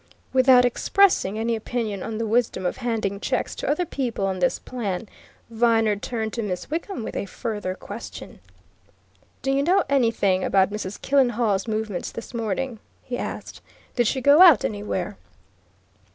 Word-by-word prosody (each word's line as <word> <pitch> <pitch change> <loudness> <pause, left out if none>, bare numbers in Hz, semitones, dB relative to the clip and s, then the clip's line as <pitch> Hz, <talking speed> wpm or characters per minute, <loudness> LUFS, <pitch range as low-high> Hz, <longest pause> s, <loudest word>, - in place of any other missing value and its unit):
Without 255 -1 +6
expressing 245 - +2
any 230 +1 0
opinion 220 -3 -3
on 220 - -4
the 225 - -1
wisdom 225 -3 0
of 180 - -1
handing 225 -5 -2
checks 255 +4 -1
to - - -4
other 305 +5 +1
people 245 -10 -2
on 190 -1 -2
this 260 - +2
plan, 220 -4 -4 0.4
Viner 225 -2 +3
turned 220 +1 -4
to 235 - -2
Miss 195 +3 -4
Wickham 330 - -3
with - - -6
a - - -3
further 205 -4 -4
question. - - -9 1.0
"Do 270 - +1
you 275 +1 +2
know 365 +6 +3
anything 225 -8 +2
about 190 0 +3
Mrs. 205 -1 -5
Killenhall's 240 -7 +1
movements 215 -3 -3
this 230 - -8
morning?" 230 +1 -3 0.2
he 250 - -4
asked. - - -6 0.3
"Did 240 -3 +2
she 265 - 0
go 285 +6 +6
out 335 - +8
anywhere?" 205 -2 -3
230 Hz, 155 wpm, -24 LUFS, 205-255 Hz, 1.0 s, out